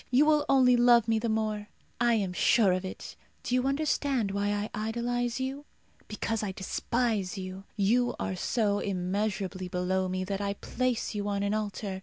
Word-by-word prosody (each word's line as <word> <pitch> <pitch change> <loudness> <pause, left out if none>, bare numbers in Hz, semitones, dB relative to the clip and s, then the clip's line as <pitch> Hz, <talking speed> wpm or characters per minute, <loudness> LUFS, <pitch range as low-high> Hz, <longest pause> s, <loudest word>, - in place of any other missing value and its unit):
You 260 +4 +5
will 300 -1 +3
only 255 -2 +5
love 240 -2 +5
me 225 -1 +2
the 230 +1 -2
more. 215 -1 -1 0.3
I 240 -1 +3
am 195 -4 -1
sure 210 +1 +4
of 185 +1 0
it. 185 - -7 0.3
Do - - -3
you 255 +1 +2
understand 275 -6 0
why 200 +1 -1
I 205 +1 -2 0.2
idolize 240 +1 -1
you? 270 +2 -4 0.4
Because 220 +1 -2
I 200 -3 -3
despise 210 +1 -1
you. 190 +1 -7
You 235 +4 +2
are 190 - -2
so 205 +2 0
immeasurably 190 0 -2
below 185 +1 -1
me 185 0 -2
that 195 +1 -3
I 200 0 -1
place 250 +2 -2
you 205 -1 -3
on 200 -1 -1
an 200 +1 0
altar. 205 -2 -3
210 Hz, 180 wpm, -29 LUFS, 195-245 Hz, 0.4 s, You